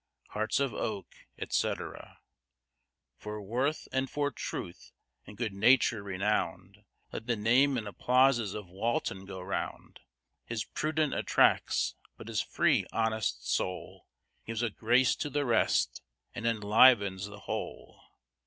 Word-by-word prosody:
Hearts 110 +4 -1
of 135 -4 0
oak, 105 -3 -5
etc. - - -3 1.0
For 105 0 -6
worth 125 +9 -1
and 130 0 0
for 145 -1 -1
truth, 90 -7 -6 0.4
and 105 - -11
good 110 -4 -2
nature 115 +1 +4
renown'd, 95 0 -2 0.3
Let 115 - -7
the 120 - +1
name 125 +6 +3
and 110 -3 -4
applauses 125 -1 +2
of 105 -1 -5
Walton 95 0 -2
go 95 -1 -7
round: 95 +2 -5 0.4
His 115 -2 -3
prudence 155 -1 -1
attracts - - +2 0.2
but - - -10
his - - 0
free, - - +1
honest 110 -2 -1
soul 90 -1 -3 0.4
Gives 115 +1 -2
a 115 - 0
grace 120 +5 +3
to 150 - -3
the 145 0 -1
rest, 115 -3 +2 0.3
and 120 -1 -3
enlivens 105 -3 +4
the 105 0 -11
whole. - - -6
110 Hz, 130 wpm, -30 LUFS, 100-125 Hz, 1.0 s, nature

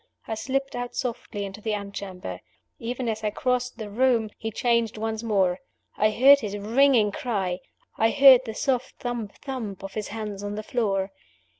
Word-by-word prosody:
I - - -2
slipped 270 +4 -2
out 245 0 -4
softly 225 -5 -3
into 195 +2 -8
the 215 0 -1
antechamber. 200 -2 -6 0.4
Even 245 +1 -3
as 220 -1 -2
I 210 - +2
crossed 250 +3 -1
the 220 -3 -5
room, 230 0 +2
he 225 - -3
changed 235 0 +1
once 220 0 -2
more. 190 -5 +1 0.4
I 215 - +3
heard 270 +6 +7
his 205 -4 -4
ringing 225 +1 +4
cry; 200 -11 -2 0.4
I 225 - +5
heard 270 -1 +8
the 220 -2 -5
soft 260 -3 -1
thump 240 -4 -4
thump 225 -9 -5
of 195 0 -7
his 215 -1 -3
hands 210 -2 -5
on 205 0 -4
the 215 - -4
floor. 200 -5 0
220 Hz, 175 wpm, -26 LUFS, 205-245 Hz, 0.4 s, heard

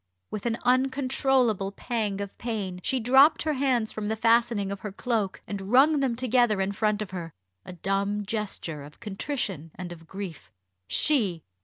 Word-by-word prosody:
With 215 +2 -3
an 230 0 0
uncontrollable 255 -4 +2
pang 210 -4 -2
of 200 -1 -6
pain 205 -6 -3
she 260 +7 0
dropped 265 +6 +5
her 310 - 0
hands 255 -5 +1
from 215 -1 -4
the 220 - 0
fastenings 225 -3 +2
of 200 - -4
her 210 - -6
cloak, 215 -2 -2
and 195 -1 -5
wrung 285 +4 +6
them 265 -4 +1
together 240 -3 +2
in 190 +1 0
front 210 +1 0
of 195 - -11
her 170 -4 -6 0.3
a 185 - -8
dumb 200 +3 -1
gesture 200 -8 -4
of 145 +1 -13
contrition 200 - -3
and 180 -1 -7
of 165 -1 -11
grief. 190 -6 -7 0.4
She! 195 - +2
215 Hz, 170 wpm, -27 LUFS, 195-250 Hz, 0.4 s, wrung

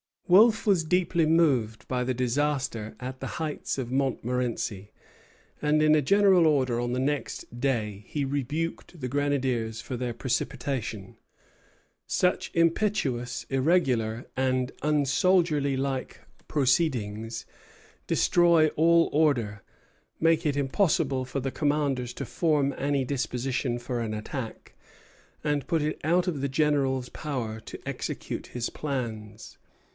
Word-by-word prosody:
Wolfe 215 +5 +6
was 190 -6 +3
deeply 170 -1 +2
moved 135 -10 +2
by 125 -1 0
the 130 - 0
disaster 125 -3 -1
at 130 +1 -6
the - - -5
heights 155 -4 -3
of 125 -2 -4
Montmorenci, 125 -6 -1 0.7
and 150 +1 +3
in 155 0 +5
a 155 - +4
General 190 +2 +5
Order 130 -6 +2
on 120 0 -1
the 125 - -1
next 140 -3 -3
day 110 -7 -1
he 145 - -2
rebuked 145 +5 -3
the 125 - -3
grenadiers 130 -5 -1
for 125 - -5
their 120 -1 -3
precipitation. 115 -4 -3 0.9
"Such 180 0 +1
impetuous, 165 - 0
irregular, 130 -6 +1
and 130 -1 +1
unsoldierlike 145 -3 +1 0.3
proceedings 120 -6 0 0.6
destroy 170 -2 +4
all 165 +2 +4
order, 125 -10 +1 0.6
make 165 0 +3
it 145 -2 +1
impossible 140 -2 +1
for 135 +2 -3
the 135 +1 -2
commanders 140 -5 0
to 140 - -5
form 145 -2 +1
any 140 -1 0
disposition 125 -1 -2
for 120 0 -4
an 110 -2 -2
attack, 110 +2 -6 0.7
and 145 -2 -1
put 165 -3 +1
it 150 +1 -2
out 175 +3 +3
of 170 -6 -2
the 140 +1 -1
general's 135 -3 +1
power 125 -8 -4
to - - -9
execute - - -4
his 120 -1 -3
plans. 110 -7 -5
135 Hz, 125 wpm, -27 LUFS, 125-155 Hz, 0.9 s, Wolfe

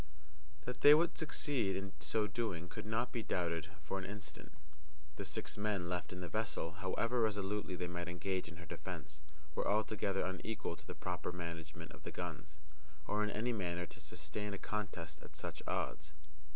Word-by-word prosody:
That 125 - -3
they 145 +1 +12
would 165 +2 +4
succeed 140 -9 +2
in 100 0 -2
so 95 +9 +2
doing 105 -7 -1
could 90 - -5
not 115 +3 +2
be 120 - 0
doubted 85 -3 +1
for 95 - -1
an - - -4
instant. 95 -6 -5 0.7
The - - -1
six - - -2
men 100 -4 +1
left 90 0 -1
in 90 - -4
the 90 - -2
vessel, 105 -4 0
however 100 +6 +2
resolutely 105 -3 +1
they 90 - -1
might 85 0 -2
engage 90 +1 0
in 85 - -8
her 85 +1 -8
defence, 75 -1 -5 0.3
were - - +1
altogether 105 -2 +3
unequal 95 0 -1
to - - -15
the 90 - -4
proper 90 -1 -1
management 85 -3 -5
of - - -11
the - - -4
guns, 80 -3 -4 0.5
or 105 +4 +2
in 105 - +2
any 120 +4 +1
manner 90 -4 0
to 90 - -11
sustain 90 +5 -3
a - - -4
contest 100 -6 -3
at - - -12
such - - -4
odds. 75 0 -1
95 Hz, 180 wpm, -39 LUFS, 85-105 Hz, 0.7 s, they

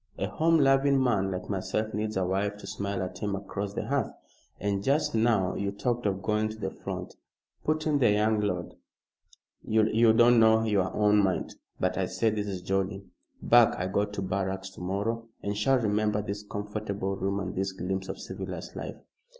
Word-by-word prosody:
A - - -1
home 160 +11 +2
loving 135 -1 +4
man 110 -7 +2
like 90 -1 -4
myself 110 +2 -2
needs 105 -1 -2
a 95 - +1
wife 100 +2 -1
to - - -11
smile 100 -2 -3
at 95 0 -6
him 100 -1 -1
across 100 +1 -5
the - - -2
hearth." - - 0 0.5
"And 100 0 -1
just 140 +7 +1
now 110 -5 +2
you 100 0 -2
talked 120 +3 -1
of 100 -1 -2
going 110 0 +1
to 110 - -8
the 110 - -3
front," - - -6 0.5
put 155 0 0
in 150 -2 +2
the 120 - +5
young 105 +1 +2
lord. 90 -4 -2 0.9
"You 110 +1 +4
don't 120 +1 +6
know 110 0 +5
your 100 -4 +1
own 105 -1 +4
mind. 95 -2 -1 0.3
But, - - 0
I - - +1
say, 115 -1 +1
this 105 -1 -2
is 95 -3 -4
jolly. 95 +1 -1 0.4
Back 120 -1 +6
I 90 - -2
go 100 +2 +1
to 105 -1 -6
barracks 95 0 -2
to 95 - -12
morrow 105 +5 -2 0.2
and 100 0 -2
shall 130 +6 +3
remember 105 -2 +1
this 105 -1 -4
comfortable 100 -1 -4
room 100 +1 -1
and 95 -1 -4
this 95 0 -1
glimpse 95 +1 -3
of - - -4
civilized - - -6
life." - - -6
105 Hz, 190 wpm, -28 LUFS, 95-110 Hz, 0.9 s, don't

